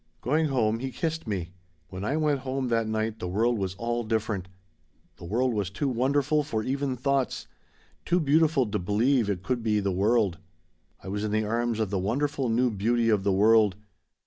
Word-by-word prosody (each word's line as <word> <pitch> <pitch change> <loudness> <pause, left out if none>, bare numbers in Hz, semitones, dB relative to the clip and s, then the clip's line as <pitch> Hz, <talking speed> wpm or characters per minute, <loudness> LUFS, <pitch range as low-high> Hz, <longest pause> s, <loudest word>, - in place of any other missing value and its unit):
"Going 155 +5 +1
home 115 -5 +1
he 130 +2 -3
kissed 160 -3 -3
me 95 -5 -3 0.4
"When 95 +1 -7
I 140 +8 0
went 150 -3 +1
home 130 0 -3
that 115 -1 +1
night 110 0 -2
the 90 - -4
world 110 +5 +1
was 95 -1 -3
all 120 +3 -2
different. 110 -4 -2 0.7
The - - -10
world 120 +7 0
was 100 -4 -1
too 140 +9 -2
wonderful 140 +4 +1
for 115 -7 -3
even 135 +1 -1
thoughts. 135 +1 -1 0.6
Too 175 +1 +2
beautiful 155 -2 +3
to 105 -1 -2
believe 110 +5 +1
it 95 -2 -2
could 125 +3 -1
be 110 -2 +1
the 100 -1 -1
world. 100 -1 +1 0.6
"I - - -9
was 100 +2 -3
in 110 - -1
the 110 +1 0
arms 115 +1 -1
of 110 -3 -1
the 100 - 0
wonderful 135 +6 -1
new 120 +2 +2
beauty 115 +3 +1
of 105 -3 +2
the 100 - +2
world. 105 0 +4
115 Hz, 195 wpm, -27 LUFS, 105-130 Hz, 0.7 s, world